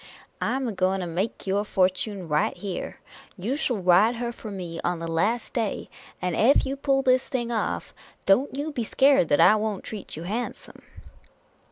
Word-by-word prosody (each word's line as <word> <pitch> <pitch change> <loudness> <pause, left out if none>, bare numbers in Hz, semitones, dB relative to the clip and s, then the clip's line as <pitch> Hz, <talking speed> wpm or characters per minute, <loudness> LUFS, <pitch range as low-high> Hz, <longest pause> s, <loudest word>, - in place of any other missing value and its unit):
" - - -38
I - - 0
'm 265 -1 -1
a - - -1
going 190 -1 +1
to - - -3
make 180 +6 -3
your 200 +1 +1
fortune 190 -1 0
right 150 0 +1
here. 195 -3 -5 0.4
You 215 +9 -2
shall 265 -6 0
ride 190 +5 +4
her 235 0 -3
for 230 -2 -9
me 175 -4 -6
on 175 0 0
the 165 0 -5
last 205 +9 0
day; 225 -4 -2 0.3
and 180 -2 -1
ef 260 +6 +4
you 270 +1 -2
pull 275 -1 +1
this 255 0 +3
thing 240 -2 -2
off, 225 -2 -2 0.3
don't 255 +8 +3
you 300 +2 -2
be 250 -5 -2
scared 270 - +4
that 145 - +2
I 215 - +7
won't 215 -2 -2
treat 215 -3 -7
you 160 - -6
handsome." 220 +7 -5
210 Hz, 195 wpm, -25 LUFS, 185-245 Hz, 0.4 s, I